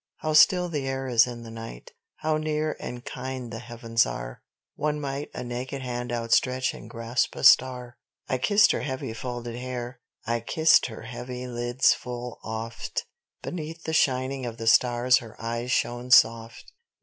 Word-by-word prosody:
(How 155 0 -2
still 180 +3 +6
the 145 -5 -3
air 135 0 -2
is 120 -2 +4
in 120 -1 -7
the 115 - -9
night, 115 - -9 0.2
how 155 0 0
near 155 0 -1
and 125 +1 -7
kind 130 -3 -6
the 115 - -5
heavens 115 -1 0
are, - - -6 0.3
One 150 0 -1
might 140 0 -4
a - - -4
naked 125 +2 -5
hand 120 -1 -4
outstretch 125 +2 +1
and - - -11
grasp 115 +1 -1
a - - -6
star!) 125 -2 +4 0.3
I 130 - -1
kissed 205 +8 +5
her - - -1
heavy, 130 -5 -4
folded 120 0 -5
hair. 125 0 -5 0.3
I 115 0 0
kissed 160 +8 +4
her 110 -2 -9
heavy 125 +1 -6
lids 120 +1 +2
full 125 -1 -7
oft; 115 +1 -4 0.4
Beneath 165 -1 -6
the 160 - -3
shining 130 -2 +1
of 115 -2 -5
the 115 - -5
stars 125 +2 +4
her 115 -2 -13
eyes 115 +2 -3
shone 120 -1 -1
soft. 115 -1 +3
125 Hz, 170 wpm, -26 LUFS, 115-135 Hz, 0.4 s, still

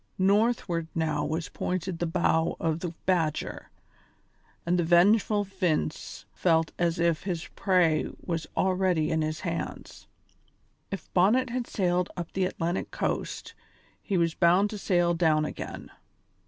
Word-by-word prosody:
Northward 195 -4 +2
now 155 -3 0
was 160 +2 -2
pointed 180 -1 -3
the 175 - 0
bow 165 -1 +1
of 160 -1 0
the 175 -1 -4
Badger, 165 -5 -1 1.0
and 175 +1 +1
the - - +2
vengeful 205 +5 +4
Vince 185 -6 -2
felt 165 -2 +2
as 170 0 +1
if 170 -2 +1
his 175 -4 -3
prey 180 -5 +2
was 165 -3 -4
already 185 -4 +1
in 160 0 +1
his 155 0 -2
hands. - - -5 0.8
If 195 - -7
Bonnet 220 +8 +3
had 245 -1 -2
sailed 180 -2 0
up 170 -2 -5
the 190 -1 +1
Atlantic 175 -1 -2
coast - - -3 0.5
he 195 - -1
was 165 -1 +2
bound 185 +5 +3
to 210 - -5
sail 175 -3 +2
down 160 -3 +2
again. - - -7
175 Hz, 140 wpm, -27 LUFS, 165-190 Hz, 1.0 s, vengeful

